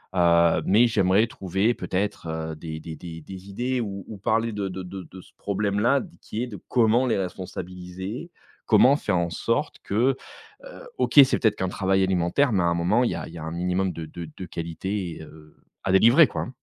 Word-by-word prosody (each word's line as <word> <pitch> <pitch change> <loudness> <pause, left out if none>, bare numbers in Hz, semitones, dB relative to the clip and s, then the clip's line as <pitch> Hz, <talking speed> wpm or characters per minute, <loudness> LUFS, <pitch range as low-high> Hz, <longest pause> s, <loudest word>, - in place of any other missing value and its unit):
Heu, 85 -1 +4
mais 110 +5 +5
j'aimerais 100 -1 +3
trouver, 100 +2 0
peut-être, 95 -1 -3
heu, 80 0 -4
des 80 0 -7
des 80 0 -7
des 80 -2 -9
des 95 +4 -10
idées, 125 +5 -2
ou 100 -4 -5
ou 110 - -8
parler 115 +4 0
de 100 -1 -2
de 95 0 -6
de 90 +1 -7
de 95 0 -12
ce - - -20
problème-là, 105 +6 +1
d 175 - -13
qui 110 +3 -4
est - - -3
de 105 -6 -8
comment 120 +1 +3
les 115 - +1
responsabiliser? 95 - -6 0.4
Comment 125 +6 +6
faire 105 -9 -1
en 85 0 0
sorte 115 - -2
que, 125 +6 +1 0.5
heu - - -11
OK, - - +4
c'est 130 - 0
peut-être 110 -4 +2
qu'un 95 - -1
travail 95 0 +1
alimentaire, 95 +8 +1
mais 95 -3 +2
un 85 0 +2
moment, 90 +8 +2
il 120 - +1
y - - -3
a - - -5
il - - -12
y - - -8
a 80 - -7
un 80 - -5
minimum 90 +2 -1
de 80 - -6
de 80 +1 -8
de 95 - -6
qualité, 90 +2 -4
heu, 75 0 -15 0.3
à 95 - 0
délivrer, 120 - +7
quoi. - - -4
95 Hz, 210 wpm, -25 LUFS, 85-115 Hz, 0.5 s, délivrer